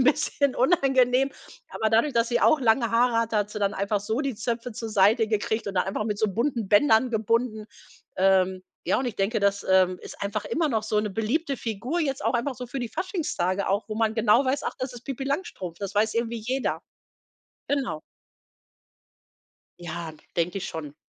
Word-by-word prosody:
'n - - +3
bisschen 285 -1 +2
unangenehm. 265 -3 +3 0.4
Aber 220 - -1
dadurch, 230 +7 +3
dass 230 0 +2
sie 240 - +1
auch 310 -3 +4
lange 230 -1 +3
Haare 235 +1 +3
hat, 230 -1 -1
hat 210 -1 +1
sie 210 - -5
dann 200 +1 +1
einfach 200 +1 0
so 220 +5 -2
die 275 -6 -2
Zöpfe 235 +2 -3
zur 225 +1 -5
Seite 215 +2 +4
gekriegt 220 +1 -1
und 195 - -5
dann 180 - +2
einfach 195 +2 -2
mit 210 -1 -2
so 215 - +2
bunten 235 -1 -1
Bändern 225 +3 +4
gebunden. 220 0 0 0.5
Ähm, 190 -1 +3 0.2
ja, - - +2
und 260 - -1
ich 240 - -4
denke, 200 +3 0
das 200 0 +1
ist, - - -10
ähm, 185 -1 +4 0.2
einfach 205 +1 -2
immer 315 +6 0
noch 220 -5 0
so 215 0 -1
eine 210 -1 +1
beliebte 270 - -1
Figur, 235 - -3
jetzt 275 -2 -2
auch - - +1
einfach 245 +3 0
so 250 0 -7
für 270 - -4
die 240 - -3
Faschingstage 200 - -2
auch, 200 +3 0
wo 215 - -4
man 220 -1 +1
genau 230 +3 +4
weiß, 265 +2 0
ach: - - -2
„Das 255 0 -4
ist 245 0 -10
Pipi 270 -1 -4
Langstrumpf.“ 275 - -4
Das 200 0 -5
weiß 215 +1 +2
irgendwie 230 0 -1
jeder 260 +2 -1 0.9
genau. 270 - -1 1.8
Ja, 170 -1 -6 0.2
denke 175 +3 0
ich 195 - -5
schon. 150 -3 -7
225 Hz, 200 wpm, -26 LUFS, 200-255 Hz, 1.8 s, auch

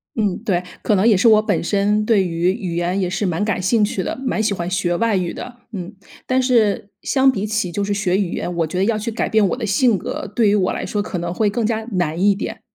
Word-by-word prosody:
嗯， 210 -5 0
对， 185 -6 0 0.2
可 210 - +2
能 195 +4 +3
也 220 - +6
是 215 +6 +3
我 215 -1 +6
本 210 -5 -1
身 205 +3 +1
对 215 -4 +3
于 170 +2 +1
语 190 -5 -4
言 175 +3 0
也 180 -2 0
是 195 +2 -2
蛮 180 +3 0
感 200 -4 -1
兴 210 +3 +2
趣 195 -2 -1
的， - - -4
蛮 220 -3 0
喜 210 -2 +1
欢 175 -2 -3
学 185 -2 0
外 230 -1 +1
语 180 -2 -1
的。 245 - -8 0.2
嗯， 190 0 -6 0.3
但 260 0 +2
是 225 -6 +2
相 265 -1 +3
比 205 -3 -3
起 210 -4 -1
就 205 - -2
是 200 0 -1
学 195 -2 0
语 190 -4 -1
言， 180 - -3
我 165 -2 +1
觉 180 - -5
得 190 - +2
要 220 +1 +1
去 215 +2 -3
改 220 - -2
变 220 -2 +3
我 - - -1
的 245 -3 -4
性 215 +2 +3
格， 180 - -5
对 220 -4 +4
于 205 - +3
我 185 -2 +1
来 - - -4
说 205 - -2
可 185 - -4
能 170 0 -3
会 210 +2 +1
更 220 +2 -1
加 220 0 -1
难 175 -1 -1
一 200 0 +4
点。 195 - -5
200 Hz, 290 characters per minute, -20 LUFS, 180-220 Hz, 0.3 s, 也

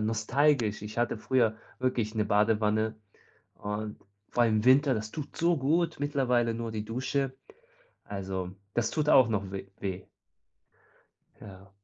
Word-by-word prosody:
nostalgisch. 115 +1 +1
Ich 105 +2 -6
hatte 120 -1 +1
früher 115 -3 +2 0.2
wirklich 120 -4 -1
'ne 105 -1 +1
Badewanne 105 +1 +2 0.6
und 105 +1 -5 0.3
vor 120 - +2
allem 110 -2 +3
im 105 - 0
Winter, 135 +2 +5
das 110 -1 -4
tut 150 -2 -7
so 170 0 +2
gut, 160 +5 +1
mittlerweile 125 -5 +1
nur 115 0 -4
die 105 -1 -3
Dusche 130 +3 -2 0.7
also, 95 -2 -4 0.2
das 120 -1 +1
tut 150 -1 -1
auch 130 -5 +7
noch 100 -3 -2
weh 100 0 -6
weh. 95 -1 -4 1.3
Ja. 95 -1 -12
115 Hz, 140 wpm, -29 LUFS, 105-130 Hz, 1.3 s, auch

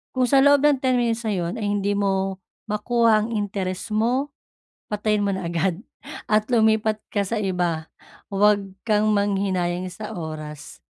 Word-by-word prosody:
Kung 255 -1 +3
sa 275 - +5
loob 285 0 +5
ng 295 -2 +5
10 260 -1 +2
minutes 235 -1 0
na 215 - 0
yun 175 -1 -2
ay 215 - -2
hindi 205 0 0
mo 195 -1 0 0.3
makuha 215 0 +2
ang - - -6
interes 195 -2 -3
mo, 245 +6 +1 0.6
patayin 210 0 0
mo - - +1
na 190 -2 -4
agad 170 +1 0 0.5
at 215 0 +3
lumipat 220 -1 +3 0.2
ka 205 - +2
sa 225 +4 -2
iba. 175 -5 -1 0.4
Wag 205 +1 +4 0.2
kang 215 -1 +2
manghinayang 190 -3 0
sa 215 -1 -7
oras. 155 -2 -7
205 Hz, 160 wpm, -23 LUFS, 185-220 Hz, 0.6 s, sa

